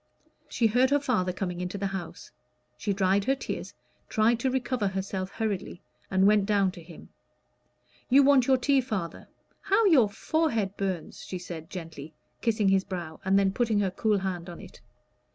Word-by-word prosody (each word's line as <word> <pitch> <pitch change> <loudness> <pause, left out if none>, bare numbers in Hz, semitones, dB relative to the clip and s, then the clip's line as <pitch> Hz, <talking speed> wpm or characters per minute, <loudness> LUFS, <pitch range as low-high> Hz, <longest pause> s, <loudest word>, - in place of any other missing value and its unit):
She 235 - 0
heard 245 +4 +4
her 285 +1 +3
father 230 -10 0
coming 180 -1 -4
into 180 +2 -4
the 200 - -3
house. 175 -3 -7 0.4
She 160 +11 -2
dried 195 0 +2
her 270 - +2
tears, - - -6 0.3
tried 225 +1 +2
to 260 - 0
recover 255 -4 -1
herself 190 0 -3
hurriedly, 205 -4 -4 0.3
and 190 0 +3
went 205 -1 +4
down 200 -3 +2
to 175 - -12
him. 165 0 -13 1.0
"You 275 +2 +6
want 270 -3 +5
your 265 -1 +5
tea, 275 +1 +2
father; 200 -9 -5 0.3
how 400 +3 +2
your 275 - +5
forehead 225 - -1
burns!" 190 -4 -4
she 185 - -5
said 170 -2 -8
gently, 160 -4 -8 0.3
kissing 215 -4 +2
his 190 0 +3
brow, 170 -5 -6
and 190 +1 +3
then 195 -1 +2
putting 225 -2 +1
her 190 -2 0
cool 210 +2 +1
hand 185 -2 -4
on 170 - -9
it. - - -13
200 Hz, 175 wpm, -27 LUFS, 185-240 Hz, 1.0 s, You